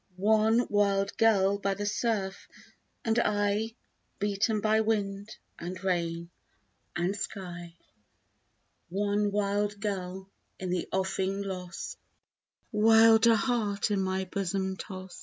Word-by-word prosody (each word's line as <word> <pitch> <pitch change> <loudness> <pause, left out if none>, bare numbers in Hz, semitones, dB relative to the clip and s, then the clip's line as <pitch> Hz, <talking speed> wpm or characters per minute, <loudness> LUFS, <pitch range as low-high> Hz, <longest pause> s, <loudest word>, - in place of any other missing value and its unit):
One 220 +4 +3
wild 200 -1 +1
gull 200 -3 +4
by 195 -1 0
the 205 +1 -4
surf 205 -3 -1 0.6
and 225 +1 +2
I, 210 +1 0 0.4
Beaten 205 +2 0
by 220 +1 +3
wind 205 -1 -2 0.2
and 180 +2 -6
rain 170 -2 -1 0.6
and 175 +3 0
sky. 175 -4 -6 1.1
One 205 +2 0
wild 205 0 0
gull 190 -2 -4 0.3
in 185 -1 -4
the 180 -1 -1
offing 190 +1 -1
lost, 180 -3 -6 0.7
Wilder 225 +1 +6
heart 215 -4 0
in 200 -2 +1
my 190 0 -1
bosom 190 0 -2
tost. 185 -2 -8
200 Hz, 110 wpm, -29 LUFS, 190-210 Hz, 1.1 s, Wilder